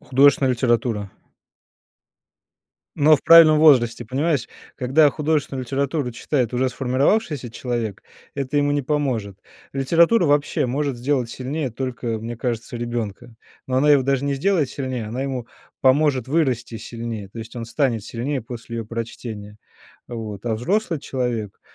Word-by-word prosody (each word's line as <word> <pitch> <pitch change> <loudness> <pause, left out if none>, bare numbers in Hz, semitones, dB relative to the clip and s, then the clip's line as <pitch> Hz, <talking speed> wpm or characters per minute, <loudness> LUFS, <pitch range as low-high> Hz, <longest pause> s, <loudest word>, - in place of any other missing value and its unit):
Художественная 135 +1 +4
литература. 115 -4 0 1.8
Но 155 +2 +6
в 140 - -2
правильном 165 -2 +8
возрасте 125 -7 +5
понимаешь, 140 0 -1 0.3
когда 140 +5 +4
художественную 150 -4 -1
литературу 135 +1 -1
читает 125 0 -1
уже 130 +1 +1
сформировавшийся 135 - 0
человек, 115 -3 -4 0.3
это 140 +1 -3
ему 145 0 +2
не 145 - 0
поможет. 125 -9 -2 0.3
Литература 170 - +3
вообще 145 -2 +1
может 140 +1 -1
сделать 125 -1 -1
сильнее 135 +2 -3
только, 120 -2 -3
мне 115 +1 -6
кажется, 120 0 -3
ребенка, 120 -1 -5 0.3
но 130 - 0
она 150 +3 +4
его 140 -2 +6
даже 135 +1 0
не 140 -1 0
сделает 155 -1 +1
сильнее, 130 -5 -4
она 125 +5 -4
ему 130 -4 -4 0.3
поможет 135 -2 +3
вырасти 130 -6 0
сильнее, 115 -3 -6
то 115 - -11
есть 115 +1 -8
он 120 - -5
станет 115 -2 0
сильнее 130 +2 -3
после 115 0 -8
её 115 - -4
прочтения. 110 -2 -7 0.5
Вот. 110 -4 -6
А 115 -2 0
взрослый 180 - 0
человек, 120 -7 -3
130 Hz, 140 wpm, -22 LUFS, 115-145 Hz, 1.8 s, правильном